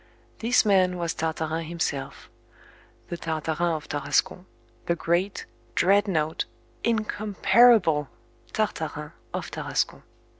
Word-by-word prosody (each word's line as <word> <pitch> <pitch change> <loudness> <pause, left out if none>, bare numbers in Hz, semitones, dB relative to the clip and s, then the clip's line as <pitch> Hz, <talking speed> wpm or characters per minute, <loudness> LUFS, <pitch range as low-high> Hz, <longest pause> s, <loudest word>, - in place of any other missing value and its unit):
This 235 0 +3
man 185 -3 +3
was 170 -2 -1
Tartarin 160 0 -2
himself 140 -5 -3 0.8
the 175 - -3
Tartarin 160 +1 -1
of 155 0 -7
Tarascon, 145 +5 0 0.4
the 170 - +2
great, 175 +4 0 0.3
dreadnought, 185 -5 +2 0.4
incomparable 215 - +3 0.4
Tartarin 160 -8 -2 0.2
of - - -4
Tarascon. - - -2
170 Hz, 90 wpm, -26 LUFS, 155-200 Hz, 0.8 s, This